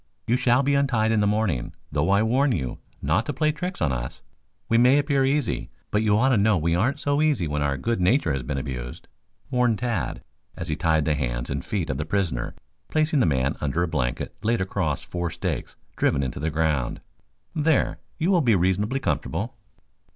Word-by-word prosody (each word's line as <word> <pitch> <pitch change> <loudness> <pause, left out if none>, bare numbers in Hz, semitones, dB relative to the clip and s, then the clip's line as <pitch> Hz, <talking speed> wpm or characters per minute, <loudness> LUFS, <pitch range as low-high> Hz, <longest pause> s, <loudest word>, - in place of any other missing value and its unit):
You 115 - +2
shall 125 +1 +3
be 140 +1 +2
untied 125 -6 +2
in 110 - +3
the 105 - +3
morning, 100 - 0 0.2
though 75 +5 +1
I 100 +2 +4
warn 130 +4 +2
you 65 - -3 0.2
not 75 +6 +2
to 145 - -1
play 155 +3 +2
tricks 175 - -4
on 75 - +2
us. 65 0 -5 0.4
We 115 - +3
may 125 +3 +6
appear 140 -2 +2
easy, 135 -1 0 0.2
but 105 - +2
you 105 -1 +3
ought 130 +4 +3
to 130 - +4
know 105 -1 +4
we 85 +1 +1
aren't 110 +11 +1
so 145 +1 +1
easy 145 - +2
when 75 0 -2
our 70 -1 0
good 115 - -1
nature 90 - +3
has 70 - -2
been 70 +3 -3
abused," 60 -2 -5 0.4
warned 125 -3 +2
Tad 110 - -2 0.3
as 85 - -5
he 75 - 0
tied 80 -4 +2
the 75 - +2
hands - - -2
and 70 -1 -2
feet 95 -9 -2
of 65 - -4
the 75 - -2
prisoner, 85 -8 -1 0.3
placing 155 -1 +2
the 125 - +3
man 70 -1 +1
under 75 +4 0
a - - 0
blanket 65 -6 -2
laid 115 +2 +1
across 95 -6 -1
four 85 -1 -3
stakes 85 -5 -4 0.2
driven 70 - +1
into 65 -1 -4
the 80 +3 -1
ground. 75 -5 0 0.5
"There, 155 -2 +3
I - - -5
think - - -14 0.2
you 170 +4 +1
will 180 -3 +4
be 120 -7 +4
reasonably 100 +8 +1
comfortable." 115 -2 -2
100 Hz, 210 wpm, -25 LUFS, 75-125 Hz, 0.5 s, may